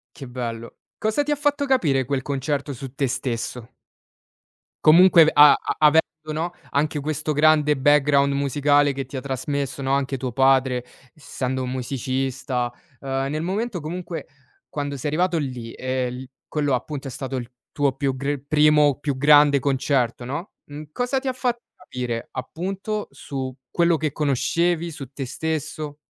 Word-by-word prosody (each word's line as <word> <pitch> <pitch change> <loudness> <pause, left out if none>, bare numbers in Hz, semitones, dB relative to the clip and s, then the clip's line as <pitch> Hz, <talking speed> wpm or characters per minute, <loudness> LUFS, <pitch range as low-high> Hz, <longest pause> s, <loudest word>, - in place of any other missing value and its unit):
Che 135 - -9
bello. 115 -2 -6 0.2
Cosa 220 +7 0
ti 295 - -2
ha - - +3
fatto 290 -1 +1
capire 155 - +2
quel 140 -1 -1
concerto 140 +1 -2
su 130 +1 -8
te 140 -1 0
stesso? 125 -2 -4 1.1
Comunque 165 0 +7
a 145 0 +8 0.2
avendo, 155 +1 +6 0.3
no? 170 +3 -2 0.2
Anche 150 +1 0
questo 155 +1 -2
grande 150 -1 +4
background 140 0 +4
musicale 145 +1 +2
che 135 0 -4
ti 135 - -11
ha 130 - -3
trasmesso, 140 0 -3
no, 135 - -1
anche 140 -1 0
tuo 125 -1 -4
padre, 130 -1 +3 0.3
essendo 130 -4 -4
un 125 - -3
musicista, 130 -1 -2 0.3
ehm, 135 0 -2
nel 155 +1 -2
momento 200 +1 -2
comunque 170 0 -5 0.4
quando 145 -1 -4
sei 145 +3 -3
arrivato 175 +2 +1
lì, 125 -6 -4
e 130 -1 -2
l 130 +1 -8 0.2
quello 145 -3 0
appunto 135 +2 -3
è - - -5
stato 135 +1 -5
il 120 -2 -5 0.2
tuo 140 -3 +1
più 135 -2 0
gr 140 +1 -2
primo 150 -2 +4
più 145 -2 -2
grande 145 0 +6
concerto, 130 -3 0
no, 145 +9 -5
mhmm, 150 +1 -9
cosa 250 - -1
ti 270 - -7
ha 260 - 0
fatto 245 -2 -1 0.2
capire, 125 -9 -5
appunto, 195 +10 -4
su 130 -2 -6
quello 170 -1 +2
che 155 -2 -1
conoscevi, 170 +5 0
su 140 -4 -9
te 135 -3 -5
stesso? 155 0 -4
140 Hz, 160 wpm, -23 LUFS, 130-155 Hz, 1.1 s, a